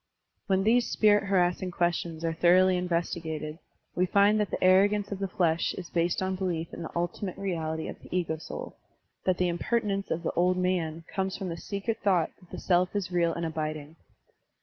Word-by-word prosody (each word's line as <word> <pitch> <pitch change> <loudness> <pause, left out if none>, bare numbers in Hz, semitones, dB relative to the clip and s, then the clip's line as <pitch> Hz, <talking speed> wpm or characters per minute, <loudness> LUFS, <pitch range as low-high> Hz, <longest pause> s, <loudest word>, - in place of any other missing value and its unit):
*' - - -51
When 190 -1 +2
these 235 +3 +3
spirit 205 -1 +4
harassing 180 -1 +1
questions 170 -2 -1
are 165 - 0
thoroughly 180 +3 +5
inves 175 -1 -1
tigated, 160 -1 -5 0.3
we 180 +1 +1
find 200 +3 +4
that 210 - 0
the - - -3
arrogance 200 +2 +4
of 200 - -4
the 195 - -1
flesh 170 -3 +1
is 180 -2 -8
based 170 +2 +1
on 190 0 -1
belief 175 -3 -3
in - - -7
the 165 - -5
ultimate 175 +2 -3
reality 160 -5 -3
of - - -8
the - - -14
ego 170 -3 -1
soul, - - -7 0.5
that 185 -1 +2
the 180 - +2
impertinence 195 +3 -1
of 165 +2 -2
the - - 0
"old 180 +1 +2
man*' 170 -3 -1
comes 190 0 -2
from 190 -3 -4
the 165 - -3
secret 200 +5 -3
thought 185 -5 +2
that 180 - -20
the - - -7
self 180 +1 +1
is 195 -3 -2
real 170 -1 +2
and 170 - -3
abiding. 155 -1 -4
180 Hz, 200 wpm, -28 LUFS, 170-195 Hz, 0.5 s, thoroughly